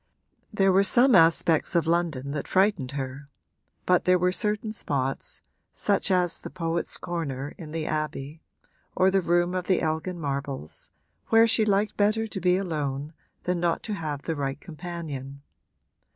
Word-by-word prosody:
There 195 Hz, -3 st, +3 dB
were 190 Hz, +1 st, +5 dB
some 245 Hz, +6 st, +5 dB
aspects 165 Hz, -1 st, +4 dB
of 170 Hz, -, +3 dB
London 165 Hz, -5 st, 0 dB
that 145 Hz, -1 st, -4 dB
frightened 185 Hz, -9 st, +2 dB
her, 135 Hz, 0 st, -5 dB, 0.6 s
but 180 Hz, -1 st, +3 dB
there 180 Hz, 0 st, +5 dB
were 180 Hz, +1 st, +2 dB
certain 210 Hz, +2 st, -1 dB
spots, 135 Hz, -9 st, -3 dB, 0.3 s
such -, -, 0 dB
as 180 Hz, -2 st, +1 dB
the -, -, -8 dB
Poets' 165 Hz, -1 st, -1 dB
Corner 145 Hz, -5 st, -4 dB
in 155 Hz, -3 st, -9 dB
the 160 Hz, -1 st, -3 dB
Abbey 155 Hz, 0 st, -3 dB, 0.5 s
or 190 Hz, +1 st, +4 dB
the 195 Hz, 0 st, +3 dB
room 175 Hz, +1 st, +1 dB
of 185 Hz, -1 st, -2 dB
the 185 Hz, -, +3 dB
Elgin 160 Hz, +3 st, -2 dB
marbles, 140 Hz, -, -4 dB, 0.4 s
where 225 Hz, 0 st, +6 dB
she 225 Hz, -1 st, +3 dB
liked 205 Hz, 0 st, +1 dB
better 215 Hz, +2 st, +2 dB
to 195 Hz, -3 st, -6 dB
be 180 Hz, 0 st, +3 dB
alone 150 Hz, -5 st, -3 dB, 0.3 s
than 180 Hz, -1 st, -1 dB
not 170 Hz, -1 st, 0 dB
to 215 Hz, -, -4 dB
have 150 Hz, -7 st, -4 dB
the 165 Hz, -, -2 dB
right 135 Hz, -1 st, -3 dB
companion. 150 Hz, -5 st, -7 dB
170 Hz, 160 wpm, -26 LUFS, 145-185 Hz, 0.6 s, where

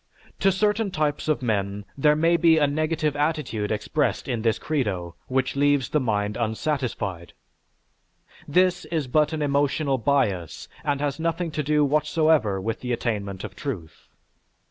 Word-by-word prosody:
To 195 Hz, -, +4 dB
certain 210 Hz, +2 st, +1 dB
types 150 Hz, -5 st, -1 dB
of 155 Hz, -4 st, 0 dB
men 100 Hz, -3 st, -1 dB
there 150 Hz, +2 st, +4 dB
may 165 Hz, +2 st, +3 dB
be 165 Hz, -1 st, +5 dB
a 150 Hz, -, +4 dB
negative 155 Hz, +1 st, 0 dB
attitude 145 Hz, -9 st, -1 dB
expressed 105 Hz, -, -1 dB
in 120 Hz, -3 st, -1 dB
this 115 Hz, -1 st, +1 dB
credo, 100 Hz, -, -2 dB
which 130 Hz, +1 st, 0 dB
leaves 140 Hz, -2 st, +2 dB
the 150 Hz, -, +2 dB
mind 105 Hz, -4 st, -1 dB
unsatisfied. 110 Hz, -, -2 dB, 1.1 s
This 180 Hz, +3 st, +2 dB
is 160 Hz, -4 st, -2 dB
but 150 Hz, +4 st, +2 dB
an 155 Hz, -2 st, -2 dB
emotional 140 Hz, -1 st, +1 dB
bias 110 Hz, -, 0 dB, 0.2 s
and 145 Hz, -1 st, -1 dB
has 145 Hz, 0 st, -1 dB
nothing 165 Hz, +1 st, -1 dB
to 155 Hz, 0 st, -2 dB
do 150 Hz, 0 st, +2 dB
whatsoever 150 Hz, -7 st, +2 dB
with 110 Hz, +4 st, -3 dB
the 125 Hz, -, -4 dB
attainment 100 Hz, -5 st, -3 dB
of 100 Hz, -3 st, -7 dB
truth. 100 Hz, -, -6 dB
140 Hz, 150 wpm, -24 LUFS, 110-155 Hz, 1.1 s, be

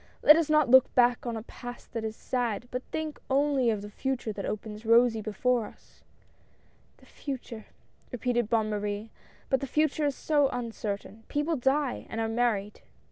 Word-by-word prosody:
Let 300 Hz, -, +9 dB
us 325 Hz, -2 st, +1 dB
not 305 Hz, -2 st, +4 dB
look 260 Hz, +1 st, +6 dB
back 245 Hz, -1 st, +3 dB
on 230 Hz, -1 st, -2 dB
a 220 Hz, -, -6 dB
Past 245 Hz, +1 st, -10 dB
that 230 Hz, -2 st, -3 dB
is 220 Hz, 0 st, -4 dB
sad, 240 Hz, -2 st, -2 dB
but 250 Hz, -, -2 dB
think 315 Hz, -1 st, -4 dB
only 275 Hz, -2 st, +2 dB
of 210 Hz, -2 st, -1 dB
the 205 Hz, -, -7 dB
Future 250 Hz, -2 st, -3 dB
that 200 Hz, -1 st, -5 dB
opens 215 Hz, 0 st, -5 dB
rosy 230 Hz, 0 st, +4 dB
before 225 Hz, +2 st, 0 dB
us." -, -, -19 dB, 0.5 s
" -, -, -35 dB
The -, -, -21 dB
Future! 245 Hz, -5 st, -7 dB, 0.2 s
" -, -, -35 dB
repeated 240 Hz, -2 st, -1 dB
Bonne 220 Hz, -2 st, +1 dB
Marie; 210 Hz, +1 st, -3 dB, 0.4 s
but 265 Hz, -, +2 dB
the 275 Hz, -, -4 dB
Future 305 Hz, +1 st, +1 dB
is 280 Hz, -, -1 dB
so 290 Hz, -3 st, +2 dB
uncertain 220 Hz, -3 st, -5 dB
— -, -, -34 dB
people 295 Hz, +3 st, 0 dB
die 270 Hz, 0 st, 0 dB
— -, -, -25 dB
and 225 Hz, -, -4 dB
are 225 Hz, -, 0 dB
married 225 Hz, -3 st, 0 dB
5? -, -, -31 dB
240 Hz, 195 wpm, -28 LUFS, 220-270 Hz, 0.5 s, Let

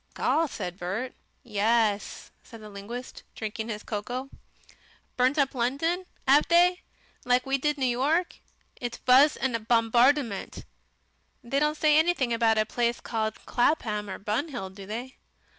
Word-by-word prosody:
"Gaw!" 325 Hz, 0 st, +1 dB
said 180 Hz, -8 st, -6 dB
Bert. 200 Hz, +9 st, -3 dB, 0.3 s
"Yess," 215 Hz, -2 st, 0 dB
said 230 Hz, -, -13 dB
the 215 Hz, -1 st, -11 dB
linguist, 230 Hz, +6 st, -8 dB
drinking 220 Hz, +1 st, -5 dB
his 210 Hz, -1 st, -5 dB
cocoa. 245 Hz, +5 st, -5 dB, 0.8 s
"Burnt 255 Hz, +4 st, +2 dB
up 275 Hz, -2 st, +2 dB
London, 285 Hz, +9 st, -1 dB, 0.2 s
'ave 280 Hz, +3 st, +5 dB
they? 355 Hz, +1 st, +4 dB, 0.4 s
Like 250 Hz, 0 st, +2 dB
we 270 Hz, 0 st, 0 dB
did 295 Hz, +2 st, 0 dB
New 265 Hz, -, 0 dB
York?" 285 Hz, +9 st, 0 dB, 0.4 s
"It 240 Hz, -1 st, -5 dB
wass 270 Hz, +4 st, +6 dB
a 250 Hz, -3 st, 0 dB
bombardment." 235 Hz, +1 st, +1 dB, 0.8 s
"They 265 Hz, +4 st, 0 dB
don't 300 Hz, +1 st, +1 dB
say 305 Hz, -1 st, +4 dB
anything 315 Hz, -7 st, +1 dB
about 225 Hz, -1 st, +2 dB
a 215 Hz, -, +3 dB
place 235 Hz, +1 st, -1 dB
called 220 Hz, -2 st, -3 dB
Clapham, 220 Hz, -6 st, 0 dB
or -, -, -5 dB
Bun 220 Hz, +9 st, -2 dB
Hill, 235 Hz, -11 st, -6 dB
do 195 Hz, 0 st, -11 dB
they?" 240 Hz, +5 st, -6 dB
245 Hz, 145 wpm, -27 LUFS, 220-280 Hz, 0.8 s, wass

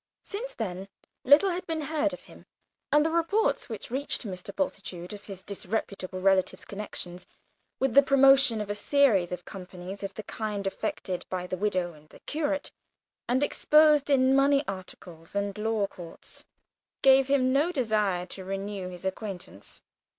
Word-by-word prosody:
Since 475 Hz, +5 st, -6 dB
then 190 Hz, -4 st, -4 dB, 0.4 s
little 295 Hz, +9 st, +6 dB
had 360 Hz, +1 st, -4 dB
been 325 Hz, -1 st, -2 dB
heard 305 Hz, 0 st, 0 dB
of 275 Hz, -, -8 dB
him, -, -, -16 dB, 0.4 s
and 295 Hz, +1 st, +5 dB
the 320 Hz, -, +1 dB
reports 335 Hz, +4 st, +1 dB
which 220 Hz, 0 st, -7 dB
reached 270 Hz, +2 st, -2 dB
Mr. 185 Hz, -3 st, -6 dB
Bultitude 190 Hz, -9 st, -4 dB
of 205 Hz, 0 st, -10 dB
his 195 Hz, -2 st, -9 dB
disreputable 195 Hz, -2 st, -4 dB
relative's 190 Hz, 0 st, +2 dB
connection 195 Hz, -3 st, -6 dB, 0.6 s
with 265 Hz, -3 st, 0 dB
the 280 Hz, -, +9 dB
promotion 275 Hz, -4 st, +5 dB
of 205 Hz, -1 st, -4 dB
a -, -, 0 dB
series 205 Hz, -4 st, +3 dB
of 180 Hz, -1 st, -5 dB
companies 185 Hz, 0 st, -8 dB
of 195 Hz, -, -5 dB
the 215 Hz, -, -6 dB
kind 210 Hz, -2 st, -4 dB
affected 185 Hz, -1 st, -3 dB
by 180 Hz, -1 st, -3 dB
the 185 Hz, -, -3 dB
widow 185 Hz, -3 st, -1 dB
and 155 Hz, 0 st, -19 dB
curate, 295 Hz, -1 st, -2 dB, 0.6 s
and 255 Hz, +3 st, +2 dB
exposed 300 Hz, 0 st, +4 dB
in 265 Hz, -1 st, +4 dB
money 275 Hz, +1 st, +4 dB
articles 180 Hz, -3 st, -8 dB
and 200 Hz, -1 st, -1 dB
law 220 Hz, -1 st, +1 dB
courts, 175 Hz, -4 st, -10 dB, 0.6 s
gave 270 Hz, 0 st, +6 dB
him 260 Hz, -2 st, +3 dB
no 295 Hz, +6 st, +3 dB
desire 210 Hz, -, 0 dB
to 190 Hz, +1 st, -9 dB
renew 195 Hz, 0 st, -4 dB
his 180 Hz, 0 st, -9 dB
acquaintance. 190 Hz, -, -6 dB
210 Hz, 160 wpm, -28 LUFS, 185-275 Hz, 0.6 s, the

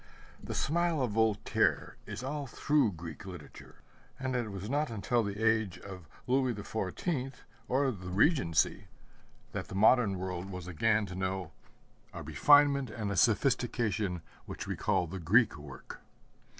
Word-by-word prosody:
The -, -, -5 dB
smile 170 Hz, +1 st, +1 dB
of 120 Hz, -, -1 dB
Voltaire 110 Hz, -1 st, +1 dB
is -, -, -6 dB
all 145 Hz, +1 st, -3 dB
through 140 Hz, -3 st, +1 dB
Greek 80 Hz, -2 st, -8 dB
literature; 90 Hz, -6 st, -11 dB, 0.4 s
and 130 Hz, -1 st, -2 dB
it 120 Hz, -3 st, -1 dB
was 100 Hz, +1 st, -6 dB
not 145 Hz, +4 st, 0 dB
until 115 Hz, +2 st, 0 dB
the 100 Hz, -1 st, -4 dB
age 110 Hz, -4 st, +2 dB
of 95 Hz, -5 st, -10 dB, 0.2 s
Louis 130 Hz, -1 st, +1 dB
XIV, 125 Hz, -, -3 dB, 0.3 s
or 135 Hz, +1 st, +2 dB
the 95 Hz, -5 st, -8 dB
Regency, 95 Hz, -, +2 dB, 0.7 s
that -, -, -4 dB
the -, -, -8 dB
modern 105 Hz, -1 st, +4 dB
world 90 Hz, 0 st, -4 dB
was 90 Hz, -3 st, -7 dB
again 105 Hz, +5 st, +1 dB
to 90 Hz, -, -8 dB
know 95 Hz, -2 st, -3 dB, 0.6 s
a -, -, -7 dB
refinement 145 Hz, -2 st, +4 dB
and 105 Hz, -4 st, -4 dB
a -, -, -2 dB
sophistication 110 Hz, -, +1 dB, 0.2 s
which -, -, -6 dB
recall 90 Hz, -, 0 dB
the 95 Hz, +3 st, -6 dB
Greek 105 Hz, +8 st, +4 dB
work. 75 Hz, -3 st, -10 dB
110 Hz, 145 wpm, -31 LUFS, 95-130 Hz, 0.7 s, modern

